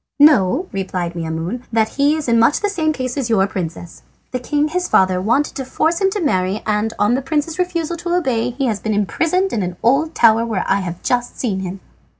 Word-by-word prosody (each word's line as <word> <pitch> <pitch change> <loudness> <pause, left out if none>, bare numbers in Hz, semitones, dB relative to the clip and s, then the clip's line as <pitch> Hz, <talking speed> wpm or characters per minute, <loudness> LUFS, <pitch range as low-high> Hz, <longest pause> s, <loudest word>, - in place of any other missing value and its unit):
"Know," 290 - +4
replied 185 -3 -3
Maimoune, 165 +7 -4
"that 220 -1 +2
he 285 +4 +2
is 310 -3 -4
in 230 -1 +3
much 230 +6 +3
the 410 - +1
same 320 -6 0
case 255 -3 -4
as 260 -4 -1
your 200 -4 +3
princess. 175 -3 -6 0.3
The 255 - -2
king, 295 +4 0
his 360 +2 -1
father, 185 -1 +3
wanted 240 +9 +1
to 270 - -3
force 320 +7 0
him 385 - +4
to 410 - -3
marry, 190 - 0
and 210 +1 0
on 205 +3 +2
the 260 - +1
prince's 305 +4 -2
refusal 345 -2 -1
to 345 +1 -2
obey 250 -9 0
he 260 +3 -2
has 220 -5 -1
been 215 0 -2
imprisoned 335 - 0
in 215 - 0
an 180 -1 -4
old 280 +7 +2
tower 225 -1 +5
where 220 -5 -2
I 195 - +2
have 175 -2 -6
just 245 -1 -1
seen 205 -7 -1
him." 190 0 -6
240 Hz, 220 wpm, -19 LUFS, 195-310 Hz, 0.3 s, tower